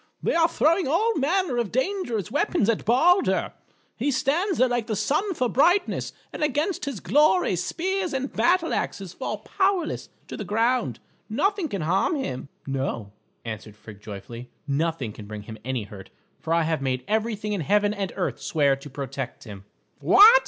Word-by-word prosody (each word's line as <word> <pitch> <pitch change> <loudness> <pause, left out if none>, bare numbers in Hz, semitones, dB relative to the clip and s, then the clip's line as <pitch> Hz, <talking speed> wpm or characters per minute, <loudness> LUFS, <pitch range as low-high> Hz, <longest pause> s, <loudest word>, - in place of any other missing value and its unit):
They - - +1
are 330 0 +4
throwing 330 +1 +2
all 415 +11 +2
manner 330 -1 +1
of 235 -5 -1
dangerous 255 - -1
weapons 285 - +1
at 230 - 0
Balder. 335 - +3 0.4
He 260 +6 -1
stands 305 +8 +1
there 255 - +5
like 240 -2 -1
the 220 - -1
sun 365 - 0
for 255 -4 +1
brightness, 355 - +2 0.2
and - - -6
against 300 +3 0
his 275 -8 -4
glory, 300 - +3
spears 365 - -1
and 270 0 -3
battle 345 -1 +2
axes 190 -3 -3
fall 215 - -4
powerless 380 - -1 0.2
to - - -6
the - - -5
ground. 225 - +1 0.3
Nothing 390 - +1
can 195 -5 -3
harm 190 - +2
him." 140 - -4 0.2
"No," 130 -6 -3 0.3
answered 110 -2 -6
Frigg 105 -1 -12
joyfully; 110 +4 -8 0.2
"nothing 145 -4 -1
can 105 -1 -10
bring 105 -1 -7
him 110 +1 -9
any 130 -2 -2
hurt, 100 -1 -11 0.3
for 160 - -5
I 165 0 +4
have 160 -2 0
made 130 -2 -1
everything 215 -1 -1
in 200 - -1
heaven 205 +6 +2
and 195 -4 -3
earth 180 - -2
swear 140 -4 +2
to 135 +2 -11
protect 135 -2 -5
him." 100 -4 -10 0.3
"What!" 410 - +8
215 Hz, 175 wpm, -25 LUFS, -, 0.4 s, What